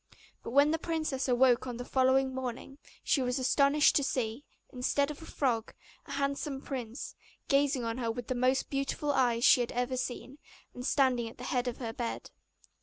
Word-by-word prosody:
But - - -7
when 285 +4 +4
the 325 - 0
princess 310 -6 -2
awoke 250 0 +3
on 245 -2 -5
the 245 - -6
following 260 0 +2
morning 260 +2 -6 0.2
she 275 - +2
was 250 0 0
astonished 280 +3 +3
to 285 - +1
see, 245 -1 -2 0.3
instead 280 +3 0
of 295 - -9
the 325 - -11
frog, 235 -5 -1 0.3
a - - -6
handsome 280 0 -2
prince, 255 -3 -6 0.4
gazing 275 -3 +2
on 230 +2 -3
her 235 -2 -1
with 240 +1 -4
the 255 - -2
most 255 +2 +1
beautiful 275 +1 -1
eyes 240 -3 +2
she - - +7
had 240 - -2
ever 250 +1 -1
seen, 260 +2 -5 0.3
and 250 +1 -5
standing 250 -4 +2
at - - -15
the 250 - -9
head 250 0 -1
of 245 - -3
her 230 -3 -5
bed. 235 0 -5
260 Hz, 190 wpm, -30 LUFS, 245-275 Hz, 0.4 s, she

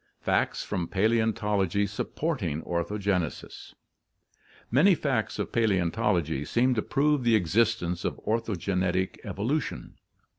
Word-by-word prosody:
Facts - - 0
from 90 -5 -3
Paleontology 105 -2 +1
Supporting 100 - -3
Orthogenesis* 90 0 -3 0.4
— - - -31
Many 185 +6 +6
facts 130 -8 -1
of - - -3
Paleontology 90 - +1
seem 125 - +2
to 110 - 0
prove 145 +1 +1
the 120 -1 +4
existence 95 -2 +1
of - - -3
orthogenetic 95 -4 -1
evolution. 130 +9 -3
105 Hz, 105 wpm, -27 LUFS, 90-115 Hz, 0.4 s, Many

